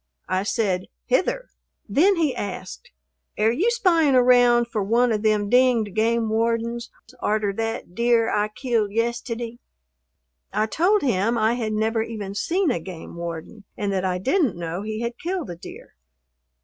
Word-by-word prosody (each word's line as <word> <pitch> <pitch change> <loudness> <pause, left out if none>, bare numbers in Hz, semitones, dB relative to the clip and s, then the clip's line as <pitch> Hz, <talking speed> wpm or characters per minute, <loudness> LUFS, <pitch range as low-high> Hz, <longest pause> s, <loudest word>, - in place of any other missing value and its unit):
I 185 0 0
said 195 -3 -1 0.2
"Hither." - - 0 0.4
Then 335 - +4
he 315 -6 +1
asked, 195 -2 -6 0.5
"Air 215 +2 +3
you 355 - +1
spying 340 - +3
around 245 -1 +5
for 220 -3 -2
one 235 +4 +2
of 210 -1 0
them 210 -1 +2
dinged 245 -3 +3
game 225 +1 +1
wardens 230 +2 -1 0.3
arter 210 -1 0
that 225 -4 -4
deer 235 +1 +2
I 210 -1 +1
killed 220 -1 -1
yisteddy?" 235 +1 -3 0.9
I 215 - +1
told 365 - +2
him 230 -2 +1
I 220 +1 +2
had 225 -3 -2
never 220 +1 0
even 215 -3 -5
seen 340 - 0
a 170 - -1
game 170 -1 -9
warden 170 +5 -7
and 200 -1 -1
that 190 -1 -1
I 185 -1 0
didn't 265 - +1
know 170 +2 -4
he 215 +1 -4
had 235 0 -4
killed 350 - -3
a - - -6
deer. 170 - -12
225 Hz, 160 wpm, -23 LUFS, 205-245 Hz, 0.9 s, around